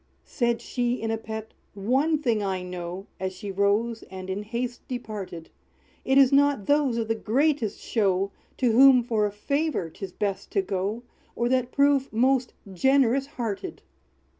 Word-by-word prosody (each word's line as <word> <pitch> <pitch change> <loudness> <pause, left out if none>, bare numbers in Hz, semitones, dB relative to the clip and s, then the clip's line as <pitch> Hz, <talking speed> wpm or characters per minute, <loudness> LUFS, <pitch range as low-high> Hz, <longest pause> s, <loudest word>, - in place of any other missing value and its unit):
Said 235 -3 0
she, 245 -1 -1
in 225 0 -2
a 225 - 0
pet, 220 0 -7 0.2
"One 265 +10 +1
thing 235 -8 0
I 190 -2 -2
know," 180 +1 -6
As 190 0 -3
she 195 +2 -6
rose, 205 +4 +1
and 190 0 -6
in 195 +2 -3
haste 240 +3 -5
departed, 210 -9 -6 0.5
"It 265 +1 +2
is 275 -1 +6
not 285 -6 +3
those 285 -5 +2
of 225 -1 -1
the 225 - +1
greatest 235 0 0
show, 195 -3 0 0.3
To 250 -3 +2
whom 255 +1 +7
for 220 -3 +1
a - - -5
favor 280 - -1
'tis 195 +1 -7
best 200 0 -3
to 195 - +2
go, 200 +4 -2 0.3
Or 235 - 0
that 255 -1 +1
prove 280 -1 +3
most 255 +2 +2 0.2
generous 265 +4 +3
hearted!" 230 -8 -5
225 Hz, 165 wpm, -26 LUFS, 200-260 Hz, 0.5 s, whom